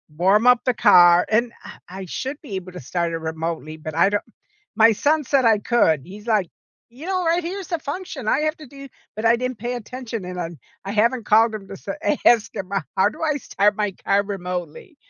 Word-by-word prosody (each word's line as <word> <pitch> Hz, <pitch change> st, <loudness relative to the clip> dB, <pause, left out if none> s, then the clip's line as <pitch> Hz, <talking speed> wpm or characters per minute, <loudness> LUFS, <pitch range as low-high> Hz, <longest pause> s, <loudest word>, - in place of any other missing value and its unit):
warm 195 Hz, +7 st, +3 dB
up 245 Hz, -1 st, +5 dB
the 250 Hz, -, +2 dB
car, 180 Hz, -6 st, +6 dB
and, 230 Hz, +2 st, +1 dB
ah, -, -, -11 dB
I 190 Hz, +1 st, -7 dB
should 270 Hz, -, -5 dB
be 225 Hz, -11 st, -7 dB
able 185 Hz, -1 st, -6 dB
to 180 Hz, -, -8 dB
start 170 Hz, +5 st, -2 dB
it -, -, -1 dB
remotely, 160 Hz, -1 st, -5 dB
but 155 Hz, 0 st, -7 dB
I 170 Hz, +4 st, +4 dB
don't 205 Hz, 0 st, -1 dB, 0.5 s
my 225 Hz, +1 st, +6 dB
son 300 Hz, +7 st, +1 dB
said 265 Hz, 0 st, +2 dB
I 220 Hz, -2 st, +5 dB
could, 180 Hz, -, +2 dB
he's 205 Hz, +4 st, -12 dB
like, 210 Hz, -6 st, +1 dB, 0.4 s
"You 265 Hz, +8 st, -11 dB
know, 370 Hz, -1 st, -1 dB
right 340 Hz, +1 st, +1 dB
here 365 Hz, +4 st, -4 dB
is 375 Hz, -, -9 dB
the 340 Hz, -, -1 dB
function 300 Hz, -, -6 dB
I 275 Hz, -, +2 dB
have 310 Hz, +1 st, -1 dB
to 305 Hz, -, -11 dB
do" 275 Hz, +1 st, -12 dB, 0.3 s
but 215 Hz, -, -5 dB
I 230 Hz, +1 st, +5 dB
didn't 255 Hz, -1 st, -4 dB
pay 240 Hz, +3 st, -3 dB
attention, 240 Hz, -2 st, -6 dB
and 180 Hz, 0 st, -6 dB
I'm 165 Hz, -2 st, -6 dB, 0.3 s
I 195 Hz, -, -5 dB
haven't 230 Hz, +3 st, +1 dB
called 220 Hz, +1 st, +4 dB
him 195 Hz, -2 st, -8 dB
to 195 Hz, -, -8 dB
sa 195 Hz, -, -6 dB, 0.3 s
ask 230 Hz, -2 st, +4 dB
him, 195 Hz, -2 st, -6 dB, 0.3 s
how 190 Hz, +1 st, +4 dB
do -, -, -11 dB
I 305 Hz, -2 st, +1 dB
start 205 Hz, -5 st, +1 dB
my 210 Hz, -2 st, -1 dB
car 200 Hz, +2 st, 0 dB
remotely? 195 Hz, -, -6 dB
215 Hz, 225 wpm, -22 LUFS, 185-260 Hz, 0.5 s, car